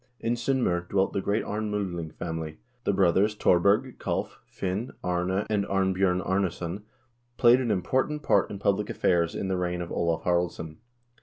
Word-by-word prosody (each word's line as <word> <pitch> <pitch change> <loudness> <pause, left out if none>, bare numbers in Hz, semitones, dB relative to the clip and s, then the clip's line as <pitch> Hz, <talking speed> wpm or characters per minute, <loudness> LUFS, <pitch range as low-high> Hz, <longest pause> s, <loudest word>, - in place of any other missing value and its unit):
In 115 - 0
S0ndm0r 120 -9 0
dwelt 95 -1 +1
the 100 - 0
great 100 +3 0
Arnm0dling 100 -6 -3
family. 80 -2 -5 0.3
The - - +3
brothers 95 +2 +3
Thor 90 -4 +4
berg, 105 +8 +2
Kalv, - - -3
Finn, 100 +6 -3
Arne, 90 +2 0
and 105 -2 +1
Arnbj0rn 95 -2 +1
Arnesson 95 0 -1 0.6
played 125 +1 +6
an 120 - -1
important 130 +10 0
part 100 - +3
in 100 - -5
public 100 +1 0
affairs 85 -2 +1
in 95 - -2
the 95 -1 0
reign 90 -1 -1
of 85 -1 -5
Olav 85 -1 0
Haraldsson. 85 -3 -1
95 Hz, 160 wpm, -27 LUFS, 90-105 Hz, 0.6 s, played